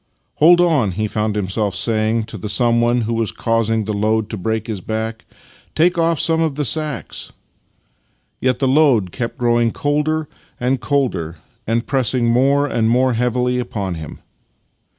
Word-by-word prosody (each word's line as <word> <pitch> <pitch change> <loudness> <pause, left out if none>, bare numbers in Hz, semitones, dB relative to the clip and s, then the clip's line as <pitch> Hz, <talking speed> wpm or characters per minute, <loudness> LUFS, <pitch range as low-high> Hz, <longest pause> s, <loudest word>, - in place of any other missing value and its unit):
" - - -48
Hold 175 +3 +7
on," 150 - +2
he 110 +4 -2
found 105 0 -2
him 100 -3 -1
self 100 0 -1
saying 110 +1 0
to 110 - -9
the 105 - -5
someone 120 +2 +2
who 115 0 -1
M'as 110 - -1
causing 115 -1 0
the 105 - -2
load 110 +1 0
to - - -3
break 110 +3 -2
his 105 -5 -5
back. 110 +2 -4 0.2
" - - -28
Take 175 +3 +3
off 165 -2 +1
some 165 -1 +2
of 160 -4 0
the 150 0 -1
sacks." 155 +4 -2 1.1
Yet 130 -1 +1
the 135 - 0
load 130 - +3
kept 115 +4 -4
growing 120 -2 +2
colder 150 +2 -1 0.3
and 125 +1 0
colder, 115 - -1 0.3
and 115 +1 0
press 130 -2 +1
ing 120 -2 +1
more 135 +5 +3
and 115 -5 0
more 125 +2 +2
heavily 125 +1 0
upon 100 -6 -3
him. 80 -3 -8
120 Hz, 175 wpm, -19 LUFS, 110-135 Hz, 1.1 s, Hold